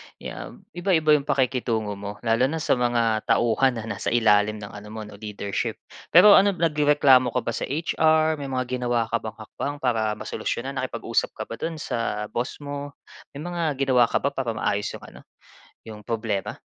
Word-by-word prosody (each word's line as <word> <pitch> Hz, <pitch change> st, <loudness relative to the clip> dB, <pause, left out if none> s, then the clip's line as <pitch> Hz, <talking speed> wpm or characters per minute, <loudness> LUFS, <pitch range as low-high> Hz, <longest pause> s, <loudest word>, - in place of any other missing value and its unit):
'yan -, -, -9 dB
iba-iba 175 Hz, -3 st, +2 dB
'yong 145 Hz, -2 st, +3 dB
pakikitungo 125 Hz, -6 st, 0 dB
mo, 100 Hz, +1 st, -6 dB
lalo 115 Hz, +2 st, +3 dB
na 155 Hz, -, -3 dB
sa 125 Hz, -, +2 dB
mga 115 Hz, -3 st, +1 dB
tauhan 120 Hz, +3 st, +3 dB
na 115 Hz, -, -5 dB
nasa 115 Hz, -, -5 dB
ilalim 110 Hz, -2 st, +3 dB
ng 105 Hz, -1 st, -8 dB
ano 105 Hz, 0 st, -10 dB
mo 110 Hz, 0 st, -7 dB
'no, 105 Hz, -1 st, -12 dB
leadership. 105 Hz, -2 st, -3 dB, 0.3 s
Pero 195 Hz, +5 st, +8 dB
ano 200 Hz, 0 st, +2 dB
nagrereklamo 145 Hz, -5 st, +4 dB
ka -, -, +1 dB
ba -, -, -2 dB
sa -, -, -3 dB
HR? 155 Hz, +1 st, +2 dB
May 140 Hz, -, -5 dB
mga 130 Hz, -1 st, -2 dB
ginawa 120 Hz, -2 st, 0 dB
ka 115 Hz, -, +1 dB
bang 110 Hz, -1 st, -7 dB
hakbang 125 Hz, +6 st, -5 dB
para 115 Hz, -6 st, 0 dB
masolusyunan? -, -, -4 dB
Nakipag-usap -, -, -2 dB
ka -, -, -4 dB
ba -, -, -8 dB
do'n 165 Hz, -, -3 dB
sa 115 Hz, -7 st, -3 dB
boss 120 Hz, +5 st, -4 dB
mo, 145 Hz, 0 st, -6 dB, 0.4 s
may 145 Hz, -, -6 dB
mga 170 Hz, -4 st, -2 dB
ginawa 130 Hz, -3 st, +3 dB
ka -, -, -1 dB
ba 140 Hz, -, +1 dB
para 130 Hz, -5 st, -3 dB
maayos 105 Hz, -1 st, -1 dB
'yong -, -, -11 dB
ano, -, -, -12 dB, 0.7 s
'yong 105 Hz, -1 st, -10 dB
problema? 110 Hz, -3 st, -3 dB
125 Hz, 185 wpm, -24 LUFS, 110-145 Hz, 0.7 s, Pero